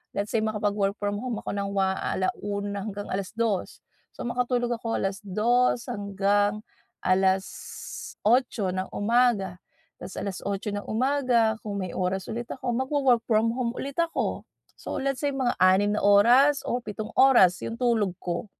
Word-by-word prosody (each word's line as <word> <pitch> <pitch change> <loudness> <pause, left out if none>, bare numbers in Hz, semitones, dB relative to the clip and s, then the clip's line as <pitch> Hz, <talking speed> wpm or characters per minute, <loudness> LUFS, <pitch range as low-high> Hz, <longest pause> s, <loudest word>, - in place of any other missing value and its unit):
let's 205 +1 -2
say 230 - +2
makapag-work 210 -2 0
from 205 -1 -2
home 240 -2 -3
ako - - -3
ng 200 0 -2
wa 190 -1 +2
1:00 200 +1 -2
hanggang 205 0 -6
2:00 200 +1 -2 0.3
So - - -6
makatulog 245 0 0
ako 230 -1 -2
2:00 215 +6 +1
hanggang 205 0 0 0.4
8:00 190 +3 0
ng 185 +1 -3
umaga. 205 -4 +2 0.4
Ta’s - - -8
8:00 200 +2 -3
ng 205 0 -5
umaga 240 -2 +2
kung 205 -2 -5
may 180 - -5
oras 185 +3 -2
ulit 235 +1 -4
ako, 255 -1 -4
mag-wo-work 260 -1 +2
from 225 0 +3
home 240 0 -2
ulit 280 +4 -5
ako. 335 -1 -1 0.3
So - - -5
let's 275 -1 -1
say 285 - 0
mga 260 -3 0
6 195 +3 +4
na - - -1
oras 245 +8 +6
o 245 - -1
7 215 -1 -6
oras 240 -10 +6
'yong 230 +2 -6
tulog 225 -6 +2
ko. 175 +4 -3
215 Hz, 150 wpm, -26 LUFS, 200-245 Hz, 0.4 s, oras